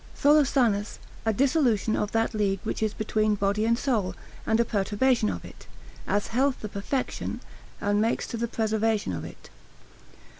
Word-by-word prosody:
Tholosanus, 265 -8 +3 0.3
a - - +5
dissolution 250 -3 +2
of 210 - -1
that 225 +1 +1
league 200 -3 0
which 220 - -3
is 215 -1 +1
between 215 0 0
body 200 +2 0
and 230 0 +3
soul, 225 -9 0 0.3
and 220 +1 +2
a 235 - +4
perturbation 215 +3 +1
of - - -5
it; - - -13 0.4
as 205 +1 0
health 265 +2 +1
the 215 - -5
perfection, 205 +7 -3 0.4
and 205 0 +1
makes 225 +2 0
to - - -6
the 235 +1 -1
preservation 220 - 0
of 80 - -4
it. - - -11
220 Hz, 160 wpm, -26 LUFS, 205-235 Hz, 0.4 s, a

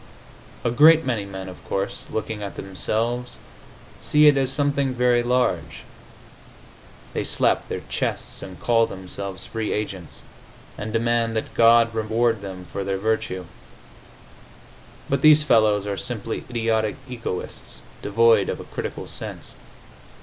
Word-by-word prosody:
A 120 - +1
great 160 +5 +6
many 110 -6 -1
men, 95 -1 -7
of 90 - -11
course, 95 0 -2
looking 110 -1 -4
at 100 - -6
themselves, 115 +6 -2 0.7
see 150 0 +4
it 150 -1 +7
as 135 -1 +1
something 140 -1 0
very 125 -1 +3
large; 125 +1 0 1.3
they - - -1
slap - - +1
their - - -4
chests - - -3
and 95 -2 -9
call 115 -1 +3
themselves 95 0 -6
free 110 -1 -3
agents, 95 -5 -5 0.5
and 110 +1 -5
demand 115 0 +1
that 110 - -3
God 115 0 +5
reward 115 0 +1
them 95 -2 -7
for 100 - -2
their 95 0 -1
virtue. 95 -3 -1 1.6
But 140 0 0
these 155 0 +7
fellows 110 -6 +3
are 100 -1 -3
simply 115 +1 -4
idiotic 115 -3 0
egoists, 115 -7 -5 0.2
devoid 110 -1 +4
of - - -3
a - - -7
critical - - -5
sense. - - -8
115 Hz, 135 wpm, -23 LUFS, 100-120 Hz, 1.6 s, it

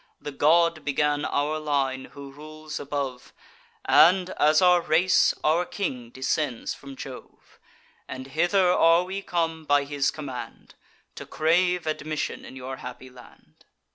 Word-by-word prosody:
The 145 - -7
god 165 +3 +3
began 145 0 0
our 150 +2 -1
line, 135 -3 -1
who 140 -1 -10
rules 155 +2 -9
above; 140 -3 -5 0.5
And, 175 +7 +5
as 155 +1 +3
our 180 -1 +5
race, 170 +3 +3
our 160 +3 +2
king 130 - -5
descends 130 0 -2
from 140 -1 -11
Jove: 130 -1 -12 0.5
And 130 0 -7
hither 175 +7 +2
are 165 0 +4
we 190 +2 -5
come, 165 -3 -2
by 145 -1 +2
his 140 -1 -1
command, 130 -5 -8 0.4
To - - -10
crave 175 +2 +1
admission 155 -1 -3
in - - -11
your 130 0 -7
happy 125 +1 -10
land. 125 -1 -18
150 Hz, 140 wpm, -25 LUFS, 135-165 Hz, 0.5 s, And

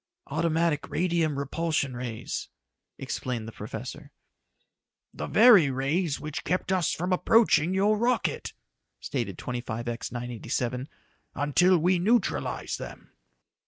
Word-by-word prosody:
"Automatic 165 0 +1
radium 165 -4 0
repulsion 140 -1 -1
rays," 120 -2 -5 0.5
explained 120 -4 -4
the - - -6
professor. - - -7 1.0
"The - - -5
very 210 - +7
rays 140 +5 0
which 150 -1 -5
kept 180 +1 -1
us 185 -4 +2
from 180 +3 -1
approaching 190 -3 +4
your 205 +3 +3
rocket," 240 +1 0 0.5
stated - - -3
25X 120 -1 -4
987, 125 +2 -3 0.5
"until 175 +6 +4
we 175 +2 +2
neutralized 225 +7 0
them." - - -9
155 Hz, 105 wpm, -27 LUFS, 125-180 Hz, 1.0 s, very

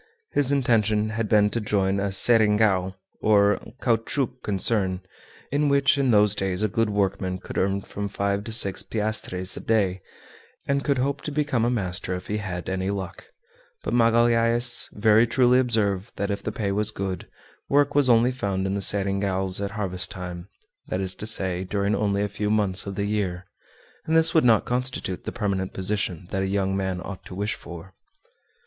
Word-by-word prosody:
His 140 -2 +2
intention 110 -6 +2
had 110 -1 -3
been 105 -1 +4
to 115 - -2
join 100 -2 0
a 100 0 -1
"seringal," 105 -3 +4 0.3
or 105 -1 +3 0.2
caoutchouc 125 +2 0
concern, 95 -2 +1 0.5
in 145 +1 +1
which 140 0 +3
in 140 -2 +1
those 105 -3 +4
days 95 0 -1
a - - +3
good 110 +3 0
workman 95 -2 -1
could - - -10
earn 100 +1 0
from 100 +1 -5
five 100 0 -1
to 115 - -5
six 100 -4 +2
piastres 105 -4 -2
a - - -6
day, 95 -5 0 0.7
and 140 0 0
could 140 -2 +1
hope 140 +2 -1
to 150 - -5
become 145 -5 0
a 120 - +2
master 95 -5 -2
if 90 - -7
he 105 - -1
had 90 -4 -5
any 95 0 -2
luck; 95 -3 -5 0.6
but - - -3
Magalhaës 115 +1 +3
very 110 +2 +4
truly 125 +1 +3
observed 110 -5 0
that 100 +1 -2
if 100 - -3
the - - -4
pay 100 -3 -2
was 105 +1 +1
good, 95 -4 -4 0.4
work 145 0 +3
was 140 -3 +3
only 120 +1 +4
found 100 -6 -2
in 95 - -1
the 100 - -2
seringals 95 -1 0
at 100 - -2
harvest 95 -3 -3
time 90 -2 -7 0.4
that 90 - -2
is 95 -1 -2
to 105 - -5
say, 95 -4 0
during 100 +2 -1
only 100 -1 0
a - - 0
few 105 +1 -3
months 100 -3 +1
of 100 - -5
the 100 - -2
year 95 -4 -2 0.6
and 160 +1 +3
this 160 +1 +5
would 160 - +4
not 115 -3 +4
constitute 125 -7 -3
the - - -3
permanent 95 -4 -2
position 95 -3 -3
that 95 - -1
a 95 - -1
young 95 -1 0
man 95 -2 -2
ought 95 -1 -8
to 90 - -9
wish 105 +3 -2
for. 85 +2 -10
105 Hz, 185 wpm, -24 LUFS, 95-115 Hz, 0.7 s, this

